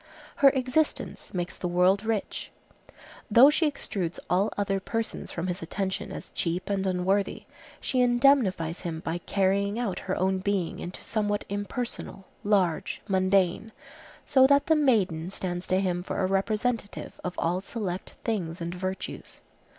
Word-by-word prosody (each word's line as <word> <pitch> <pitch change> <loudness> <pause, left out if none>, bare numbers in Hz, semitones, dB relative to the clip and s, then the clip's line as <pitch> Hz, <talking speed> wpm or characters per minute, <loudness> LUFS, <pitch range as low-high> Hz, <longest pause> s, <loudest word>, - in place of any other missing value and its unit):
Her 275 - +8
existence 265 +4 -1
makes 175 -1 -3
the 180 - -3
world 180 +3 +3
rich. 220 -2 -2 0.8
Though 245 +7 +8
she 315 0 +2
extrudes 185 - -4
all 190 +4 +3
other 195 -1 0
persons 225 +4 -3
from 170 - -3
his 180 -1 -3
attention 190 +3 -3
as - - -8
cheap 175 +3 -2
and 195 -1 0
unworthy, 190 +2 0 0.4
she 255 - 0
indemnifies 240 - +3
him 165 -3 -4
by 165 +1 -3
carrying 200 +3 +1
out 235 -6 -2
her 185 - +2
own 190 0 +1
being 190 -3 -1
into 180 - -7
somewhat 205 -2 -1
impersonal, 205 0 -4 0.2
large, 190 -6 +1
mundane, 190 +1 +2 0.5
so 265 -1 +6
that 280 +1 +4
the 320 - +4
maiden 195 - +2
stands 180 -2 -4
to 185 - +2
him 180 -2 0
for 180 - -4
a 190 - +2
representative 210 +3 -1
of 180 - -3
all 175 +3 0
select 195 -4 -5
things 180 -7 -2
and 170 0 -4
virtues. 185 +1 -5
195 Hz, 150 wpm, -27 LUFS, 180-220 Hz, 0.8 s, Her